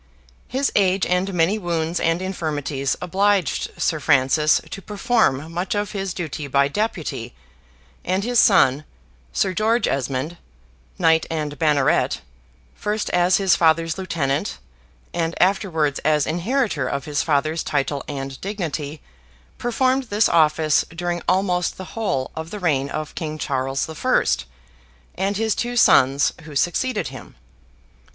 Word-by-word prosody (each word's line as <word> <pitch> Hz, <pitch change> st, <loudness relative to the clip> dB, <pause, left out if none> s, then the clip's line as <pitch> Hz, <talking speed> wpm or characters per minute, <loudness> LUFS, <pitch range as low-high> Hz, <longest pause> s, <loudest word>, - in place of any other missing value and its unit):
His 270 Hz, +2 st, 0 dB
age, 190 Hz, -2 st, +3 dB
and 180 Hz, +2 st, 0 dB
many 180 Hz, +4 st, +1 dB
wounds 170 Hz, -2 st, -1 dB
and 165 Hz, +2 st, 0 dB
infirmities, 150 Hz, -7 st, -2 dB
obliged 195 Hz, -2 st, +1 dB
Sir 160 Hz, -, +1 dB
Francis 150 Hz, +1 st, +3 dB
to 195 Hz, -, -6 dB
perform 200 Hz, -, 0 dB
much 180 Hz, +4 st, -2 dB
of 205 Hz, 0 st, -1 dB
his 195 Hz, -2 st, -3 dB
duty 155 Hz, -4 st, -4 dB
by 140 Hz, 0 st, +3 dB
deputy: 160 Hz, -, -3 dB, 0.7 s
and 185 Hz, +2 st, 0 dB
his 240 Hz, +1 st, +2 dB
son, 140 Hz, -8 st, +5 dB, 0.5 s
Sir 185 Hz, -, 0 dB
George 225 Hz, +5 st, +2 dB
Esmond, 135 Hz, +5 st, -2 dB, 0.6 s
knight 160 Hz, 0 st, +3 dB
and 150 Hz, -2 st, -3 dB
banneret, 150 Hz, -4 st, +2 dB, 0.5 s
first 210 Hz, +1 st, -2 dB
as 180 Hz, +1 st, +3 dB
his 195 Hz, -2 st, +3 dB
father's 165 Hz, +1 st, +2 dB
lieutenant, 160 Hz, -2 st, -1 dB, 0.6 s
and 165 Hz, 0 st, -2 dB
afterwards 175 Hz, -6 st, +1 dB
as 150 Hz, -2 st, +2 dB
inheritor 180 Hz, -, 0 dB
of 140 Hz, +3 st, -3 dB
his 145 Hz, -4 st, -1 dB
father's 155 Hz, +3 st, 0 dB
title 140 Hz, -1 st, -1 dB
and 135 Hz, -2 st, -6 dB
dignity, 160 Hz, -7 st, -4 dB, 0.6 s
performed 255 Hz, +2 st, +1 dB
this 210 Hz, -1 st, +2 dB
office 155 Hz, -1 st, +3 dB
during 175 Hz, +1 st, -3 dB
almost 180 Hz, -2 st, +1 dB
the 185 Hz, -4 st, -9 dB
whole 165 Hz, -13 st, -2 dB
of 160 Hz, +1 st, -5 dB
the 210 Hz, -, -6 dB
reign 140 Hz, -7 st, 0 dB
of 155 Hz, 0 st, -5 dB
King 155 Hz, -2 st, -4 dB
Charles 135 Hz, -2 st, -1 dB
the 160 Hz, -, -8 dB
First, 145 Hz, -, +1 dB, 0.7 s
and 195 Hz, +2 st, -1 dB
his 220 Hz, 0 st, +1 dB
two 245 Hz, 0 st, -3 dB
sons 135 Hz, -, +5 dB
who 150 Hz, -2 st, -11 dB
succeeded 175 Hz, -, 0 dB
him. -, -, -11 dB
165 Hz, 135 wpm, -22 LUFS, 145-195 Hz, 0.7 s, son